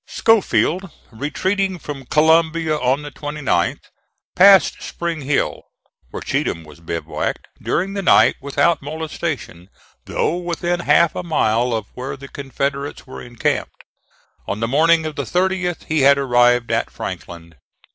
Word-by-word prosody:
Schofield 195 -4 +2 0.2
retreating 185 - -1
from 140 -5 -8
Columbia 160 +1 +3
on 135 0 0
the 145 - -7
29th, 145 - -2 0.5
passed 195 0 +6
Spring 170 -2 -4
Hill, 140 +1 -1 0.5
where - - -7
Cheatham 85 - -2
was 75 0 -15
bivouacked, 85 0 -4
during 195 +3 -1
the 200 - -2
night 185 - +5
without 145 +4 +1
molestation, 150 - -5 0.4
though 170 - -1
within 175 0 -2
half 170 -1 +3
a - - -4
mile 125 -8 +1
of 110 -2 -2
where 130 +2 -6
the 140 0 -10
Confederates 140 +1 -4
were 130 - -9
encamped. 120 -1 -3 0.6
On 100 - -3
the 115 - -1
morning 160 +5 +3
of 155 -1 -4
the 140 - -2
30th 180 +3 -1
he 160 -1 -1
had 140 +1 +6
arrived 120 -3 +3
at - - 0
Franklin. 85 -1 -8
150 Hz, 135 wpm, -20 LUFS, 125-170 Hz, 0.6 s, passed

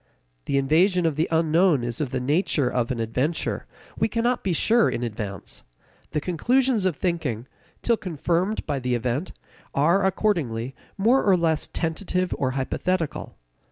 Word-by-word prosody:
The 140 - 0
invasion 170 +6 +3
of 160 -3 +1
the 155 +3 +1
unknown 165 -2 +3
is 120 +3 -2
of 145 - -1
the 130 - -2
nature 145 +1 +1
of 125 -1 0
an 125 - -2
adventure; 125 +8 -1 0.3
we - - +1
cannot 240 +2 0
be 190 - 0
sure 225 +7 +3
in 120 - -3
advance. 105 -5 -5 0.5
The 150 - -1
conclusions 230 - +1
of 180 - -1
thinking, 145 - -2 0.4
till 235 -1 +3
confirmed 180 +3 -1
by 140 - -1
the 125 -1 0
event, 125 +8 -2 0.4
are, 170 +8 +3
accordingly, 155 - 0 0.2
more 235 +7 +3
or 195 -3 +4
less 160 -2 0
tentative 180 +2 -1
or 130 - +1
hypothetical. 165 +5 -2
160 Hz, 155 wpm, -24 LUFS, 130-190 Hz, 0.5 s, or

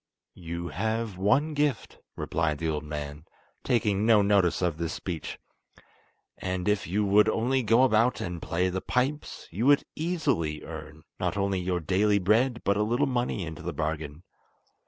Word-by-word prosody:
"You 85 +1 -5
have 110 0 -2
one 120 - +2
gift," 145 -4 -1 0.2
replied 80 -3 -1
the 80 +2 -2
old 75 -1 -2
man, 75 0 -6 0.4
taking 105 -4 +1
no 110 -2 +5
notice 100 -3 +2
of 85 -3 0
this 85 -1 -2
speech, 85 -5 -5 1.0
"and 90 0 -3
if 105 -2 +1
you 105 +4 0
would 100 +2 +5
only 130 +4 +1
go 115 +2 +4
about 120 0 +3
and 85 -2 -4
play 90 +1 0
the 95 +1 -3
pipes, 135 +4 -2
you 110 +10 -1
would 145 0 +5
easily 140 - -1
earn, - - -9 0.2
not - - -1
only 100 -1 0
your 90 0 -1
daily 100 +5 +2
bread, 115 +6 +2
but 100 0 +2
a - - +1
little 120 +7 +2
money 120 -7 -1
into 80 -1 -7
the 85 0 -4
bargain. 75 +1 -4
100 Hz, 165 wpm, -27 LUFS, 85-115 Hz, 1.0 s, no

